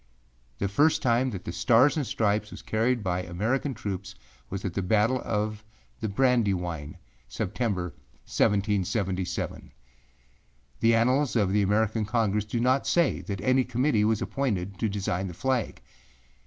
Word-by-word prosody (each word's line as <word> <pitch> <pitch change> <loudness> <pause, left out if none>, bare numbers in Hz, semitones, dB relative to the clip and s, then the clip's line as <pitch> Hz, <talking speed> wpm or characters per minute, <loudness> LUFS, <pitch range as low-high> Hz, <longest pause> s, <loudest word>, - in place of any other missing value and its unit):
The 100 - -1
first 150 +13 +2
time 125 +1 +2
that 95 -6 -7
the - - -3
Stars 120 +10 +4
and 145 -5 -1
Stripes 105 -1 0
was - - -10
carried 115 +1 0
by 90 -1 -1
American 110 +10 -1
troops 95 -2 -5 0.3
was 95 +1 -5
at 95 - -2
the 100 - -1
battle 110 +7 +2
of 105 0 -2 0.4
the 110 - -2
Brandywine, 95 - 0 0.3
September, 95 -9 -2 0.3
1777. 100 -2 -1 1.1
The 115 0 +4
Annals 125 +4 +2
of 100 -4 +2
the 105 - +3
American 110 +2 +1
Congress 105 -1 0
do 110 +3 -2
not 130 +3 +2
say 170 -4 +2
that 100 -2 -5
any 130 +4 +3
Committee 125 -2 +1
was 110 0 +1
appointed 100 -9 -2
to 110 - 0
design 95 -2 -2
the 90 - -8
flag. 130 -2 -1
105 Hz, 145 wpm, -27 LUFS, 95-125 Hz, 1.1 s, Stars